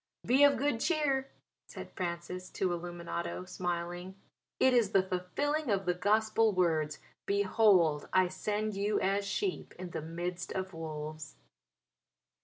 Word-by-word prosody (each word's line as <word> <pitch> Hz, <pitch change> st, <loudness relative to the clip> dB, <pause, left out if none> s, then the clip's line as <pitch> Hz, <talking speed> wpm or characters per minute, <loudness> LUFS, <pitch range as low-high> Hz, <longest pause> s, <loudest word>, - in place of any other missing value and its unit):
"Be 265 Hz, +4 st, +5 dB
of 285 Hz, -1 st, +6 dB
good 270 Hz, -4 st, 0 dB
cheer," 275 Hz, -3 st, +1 dB, 0.4 s
said -, -, -9 dB
Francis 180 Hz, 0 st, -4 dB
to 190 Hz, -, -1 dB
Illuminato, 165 Hz, -, -4 dB
smiling, 175 Hz, +1 st, -4 dB, 0.4 s
"it 260 Hz, -, +5 dB
is 235 Hz, -5 st, +3 dB
the 195 Hz, -, +5 dB
fulfilling 255 Hz, +12 st, -1 dB
of 195 Hz, -2 st, +1 dB
the 180 Hz, -, +2 dB
Gospel 215 Hz, +3 st, +2 dB
words 160 Hz, -4 st, +1 dB, 0.3 s
'Behold 195 Hz, -6 st, +3 dB
I 185 Hz, -1 st, +4 dB
send 210 Hz, +3 st, -2 dB
you 205 Hz, +1 st, +1 dB
as 200 Hz, +1 st, 0 dB
sheep 385 Hz, -, -2 dB
in 180 Hz, 0 st, -7 dB
the -, -, -4 dB
midst 175 Hz, +2 st, -4 dB
of 190 Hz, 0 st, -4 dB
wolves.'" 155 Hz, -1 st, -6 dB
185 Hz, 135 wpm, -32 LUFS, 170-215 Hz, 0.4 s, of